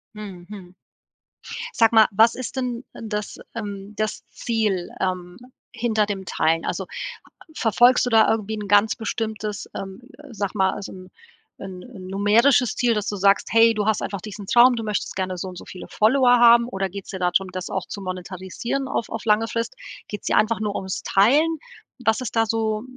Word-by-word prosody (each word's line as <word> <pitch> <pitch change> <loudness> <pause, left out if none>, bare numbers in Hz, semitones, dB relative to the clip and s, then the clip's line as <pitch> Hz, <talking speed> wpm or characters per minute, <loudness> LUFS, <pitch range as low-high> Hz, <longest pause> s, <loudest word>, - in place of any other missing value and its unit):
Mhm. 195 -4 -9
Mhm. 185 -4 -11 1.0
Sag 225 -1 +3
mal, 220 -1 +7
was 225 +3 +5
ist 255 +1 -6
denn, 250 -1 -3
äh, - - -10
das 210 -2 -4 0.2
ähm, 205 -2 -6
das 215 0 -3
Ziel, 215 -6 -1
ähm, 180 -1 -3 0.4
hinter 225 -3 0
dem 195 -2 -4
Teilen? 165 -1 0
Also, - - -3 0.7
verfolgst 240 +2 +4
du - - -1
da 225 -2 +5
irgendwie 220 -1 -1
'n 210 -1 -6
ganz 205 +2 +4
bestimmtes, 220 -2 -4
ähm, 195 +3 -7 0.3
sage 200 -4 -3
mal, 190 -1 +1
so 200 - -7
'n 185 -1 -12 0.5
'n 190 +1 -9
numerisches 225 +6 +3
Ziel, 240 -2 +2
dass 210 -1 -2
du 205 - -2
sagst, 195 +1 +3
hey, 230 0 +6
du 210 -2 -1
hast 220 -1 +1
einfach 200 -2 -4
diesen 210 -1 -8
Traum, 240 +4 +6
du 225 - -4
möchtest 210 -1 -3
gerne 185 -1 -3
so 185 - -5
und 180 - -10
so - - -10
viele 180 - -10
Follower 245 +3 +4
haben? 235 0 +7
Oder 195 -4 -3
geht's 195 +1 -9
dir 190 - -6
da 180 -1 +1
drum, 190 0 +1
das 185 -1 -5
auch 190 - -3
zu 200 - -7
monetarisieren 185 +8 -4
auf 235 - -2
auf 225 -1 -6
lange 220 +1 +3
Frist? 230 0 -3 0.3
Geht's 210 - -7
dir - - +2
einfach 215 +1 +2
nur 205 -1 -2
ums 190 -1 -4
Teilen? 295 +12 +3 0.4
Was 225 -1 +1
ist 245 -2 -5
da 225 - +4
so 220 -1 -1
210 Hz, 190 wpm, -23 LUFS, 190-230 Hz, 1.0 s, mal